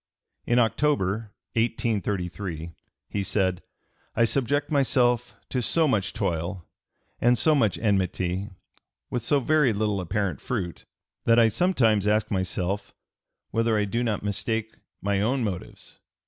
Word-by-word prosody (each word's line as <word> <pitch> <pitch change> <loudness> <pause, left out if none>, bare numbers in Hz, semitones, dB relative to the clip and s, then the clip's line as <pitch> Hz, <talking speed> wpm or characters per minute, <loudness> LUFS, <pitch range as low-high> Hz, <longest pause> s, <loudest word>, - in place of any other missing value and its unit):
In 120 - +3
October, 115 -4 +1 0.2
1833, 100 -7 -1 0.4
he 100 - -2
said: 95 -2 0 0.5
"I 115 - +4
subject 140 +4 0
myself 125 -4 +2
to 125 - -1
so 160 +6 +2
much 110 -8 +1
toil 90 -3 -2 0.5
and 120 +1 +4
so 155 +8 +4
much 110 - +2
enmity, 95 -2 0 0.6
with 125 - -1
so 140 +5 +2
very 150 -2 +3
little 105 -2 0
apparent 90 -3 -2
fruit, 85 -2 -4 0.4
that 115 0 +5
I 115 -1 +6
sometimes 110 - +2
ask 105 0 +2
myself 95 +1 -2 0.6
whether 115 -1 +2
I 105 - +2
do 115 +4 -1
not 110 -4 -1
mistake 110 +2 -2 0.3
my 100 0 +1
own 125 +4 +1
motives. 95 -5 -6
110 Hz, 130 wpm, -26 LUFS, 95-120 Hz, 0.6 s, I